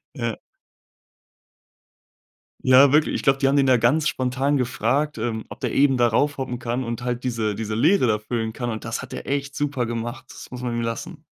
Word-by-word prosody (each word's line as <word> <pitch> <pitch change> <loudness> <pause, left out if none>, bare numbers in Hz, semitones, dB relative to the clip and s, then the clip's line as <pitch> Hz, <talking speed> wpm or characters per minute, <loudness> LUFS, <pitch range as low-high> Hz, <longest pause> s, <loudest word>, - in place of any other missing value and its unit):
ja. 115 -4 -3 2.3
Ja, 130 +2 +7
wirklich, 150 +1 +3
ich - - -2
glaube, 135 -1 +3
die 135 0 +2
haben 140 - +2
den 140 - +4
da 130 -2 +4
ganz 145 +7 +2
spontan 135 +1 0
gefragt, 130 +4 0
ähm, 110 -1 -3
ob - - -11
der - - -2
eben 135 -2 +3
da 120 -1 +4
raufhoppen 130 0 -1
kann 120 +2 -3
und 115 +1 -4
halt 125 0 -3
diese 115 -4 -1
diese 110 0 -4
Leere 150 - +3
da 110 -2 +2
füllen 110 +1 -3
kann 120 +2 -4
und 110 0 -5
das 115 0 -3
hat - - -9
er - - -7
echt 140 0 -2
super 140 -5 -1
gemacht. 120 +3 -5
Das - - -11
muss 125 -1 -7
man 120 -1 -3
ihm 120 - -1
lassen. 115 0 -5
125 Hz, 205 wpm, -23 LUFS, 115-135 Hz, 2.3 s, Ja